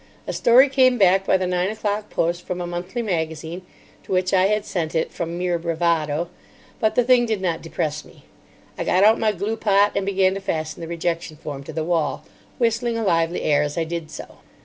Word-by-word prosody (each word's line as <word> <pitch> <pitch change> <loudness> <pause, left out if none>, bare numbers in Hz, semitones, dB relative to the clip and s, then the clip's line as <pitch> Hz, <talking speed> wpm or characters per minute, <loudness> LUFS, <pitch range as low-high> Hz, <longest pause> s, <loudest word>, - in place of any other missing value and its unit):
A - - -4
story 250 +4 +6
came 260 -2 +3
back 195 -1 +4
by - - +4
the 185 - -2
nine 180 +1 0
o'clock 210 -1 -3
post 175 +1 -1
from 180 -1 -3
a 175 - -3
monthly 180 +7 -4
magazine 160 -2 -3 0.4
(to - - -11
which 185 0 +1
I 190 0 +4
had 210 0 0
sent 165 -4 -3
it 160 - 0
from 170 0 -4
mere 175 -1 -1
bravado), 165 -1 0 0.5
but 220 - +1
the 245 - +4
thing 245 0 +4
did 220 -3 -1
not 175 -3 -2
depress 150 -2 -3
me. - - -19 0.6
I - - 0
got 185 +2 +2
out 220 +2 +5
my 220 -1 +2
glue 210 +3 -3
pot 205 -1 +3
and 200 - 0
began 190 -1 +2
to 195 - -5
fasten 155 -4 -3
the 165 - -5
rejection 170 -1 -3
form 145 -2 -7
to - - -7
the 160 +1 -2
wall, 155 -5 -1 0.3
whistling 230 0 0
a 225 - -2
lively 165 -3 +1
air 145 -1 +3
as 150 +1 -3
I 165 - +1
did 165 -1 -5
so. - - -10
180 Hz, 215 wpm, -22 LUFS, 165-210 Hz, 0.6 s, story